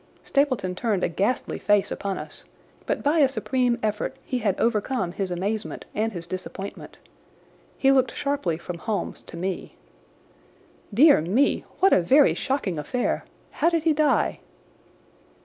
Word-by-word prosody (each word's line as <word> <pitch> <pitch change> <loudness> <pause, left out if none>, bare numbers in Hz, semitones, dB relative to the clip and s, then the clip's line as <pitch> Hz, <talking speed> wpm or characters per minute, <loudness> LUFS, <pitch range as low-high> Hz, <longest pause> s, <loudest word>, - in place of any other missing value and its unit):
Stapleton 255 -10 +1
turned 200 -1 -1
a - - +3
ghastly 200 +8 -1
face 205 -1 +2
upon 195 -1 -3
us, - - -9 0.4
but - - -1
by 300 +3 +3
a 280 -3 +5
supreme 255 -2 0
effort 210 0 -1
he 255 - -2
had 205 -5 0
overcome 225 -3 0
his 190 +1 -3
amazement 200 +5 -3
and 220 +1 0
his 175 -4 -6
disappointment. 185 +2 -7 0.8
He 270 - +4
looked 260 -1 +3
sharply 280 - -1
from 170 0 -7
Holmes 210 +4 -3
to - - -11
me. 185 +1 -4 1.2
"Dear 280 - +6
me! 210 - +1 0.2
What 385 - +6
a - - +5
very 270 - +5
shocking 215 - -2
affair! 245 - -1 0.3
How 325 - +2
did 335 -2 0
he 320 -1 +3
die?" 300 0 +2
220 Hz, 150 wpm, -25 LUFS, 185-270 Hz, 1.2 s, Dear